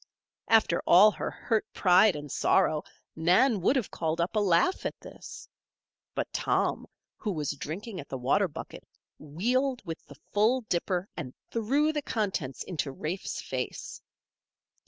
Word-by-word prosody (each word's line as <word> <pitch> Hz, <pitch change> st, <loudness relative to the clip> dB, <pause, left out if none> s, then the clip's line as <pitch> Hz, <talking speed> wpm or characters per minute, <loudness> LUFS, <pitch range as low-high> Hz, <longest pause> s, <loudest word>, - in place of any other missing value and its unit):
After 220 Hz, -6 st, +4 dB
all 200 Hz, +5 st, +8 dB
her -, -, -4 dB
hurt 220 Hz, -2 st, -2 dB
pride 185 Hz, +1 st, +5 dB
and 145 Hz, -1 st, -7 dB
sorrow, 155 Hz, -5 st, +2 dB, 0.3 s
Nan 185 Hz, +7 st, +3 dB
would 250 Hz, -, +3 dB
have 250 Hz, -7 st, -1 dB
called 160 Hz, 0 st, -2 dB
up 170 Hz, +5 st, -1 dB
a -, -, +4 dB
laugh 185 Hz, -, +2 dB
at -, -, -4 dB
this. -, -, -11 dB, 0.7 s
But -, -, -3 dB
Tom, -, -, 0 dB, 0.3 s
who 210 Hz, -, -3 dB
was 150 Hz, -6 st, -2 dB
drinking 175 Hz, +8 st, -6 dB
at 140 Hz, -, -9 dB
the 135 Hz, -, -4 dB
water 135 Hz, +11 st, +2 dB
bucket, 155 Hz, -, -9 dB, 0.4 s
wheeled 240 Hz, -, -1 dB
with 165 Hz, -1 st, -6 dB
the 145 Hz, -, -12 dB
full 220 Hz, -, +1 dB
dipper 180 Hz, -2 st, -1 dB
and 135 Hz, -6 st, -6 dB, 0.2 s
threw 275 Hz, +8 st, +1 dB
the 300 Hz, -, -1 dB
contents 195 Hz, -, -2 dB
into 155 Hz, -6 st, -3 dB
Rafe's 160 Hz, +7 st, -4 dB
face. -, -, -5 dB
185 Hz, 150 wpm, -28 LUFS, 155-220 Hz, 0.7 s, all